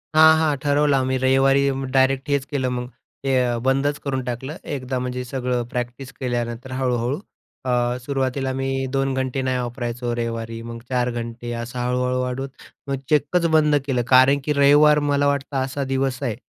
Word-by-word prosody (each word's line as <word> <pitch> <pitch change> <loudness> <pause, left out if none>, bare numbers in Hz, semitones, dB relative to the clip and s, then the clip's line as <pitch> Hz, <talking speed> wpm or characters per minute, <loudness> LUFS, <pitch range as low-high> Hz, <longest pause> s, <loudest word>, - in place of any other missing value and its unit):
हां, 160 0 +8
हां. 155 -2 +2
ठरवलं 145 0 +3
आम्ही 130 0 0
रविवारी 135 +1 +3 0.2
डायरेक्ट 135 0 +2
हेच 140 -1 +1
केलं, 135 -3 -2
मग 125 0 -4 0.3
ते 135 -1 +1
अ, 120 -1 0
बंदच 135 +2 +2
करून 130 -2 -3
टाकलं. 130 +5 -5
एकदा 130 -3 -3
म्हणजे 125 0 -3
सगळं 125 -1 -2
प्रॅक्टिस 125 +2 -5
केल्यानंतर 120 0 -3
हळूहळू. 125 0 0 0.5
अ, 125 - 0 0.3
सुरुवातीला 135 0 -1
मी 135 0 -2 0.2
2 135 0 0
घंटे 130 0 -1
नाही 130 -1 0
वापरायचो 120 0 -3
रविवारी, 115 -1 -4
मग 115 0 -7
4 125 -1 +1
घंटे, 120 0 -5
असं 120 +1 -5
हळू-हळू 125 +1 0
वाढून 130 +2 -3 0.4
मग 135 - 0
चक्कच 155 +3 +2
बंद 150 -1 +4
केलं. 130 -3 0
कारण 130 +2 +6
की 150 - +1
रविवार 145 +1 +6
मला 145 0 +2
वाटतं 140 0 -1
असा 135 +1 -3
दिवस 135 0 -1
आहे 120 -5 -1
130 Hz, 165 wpm, -22 LUFS, 125-140 Hz, 0.5 s, हां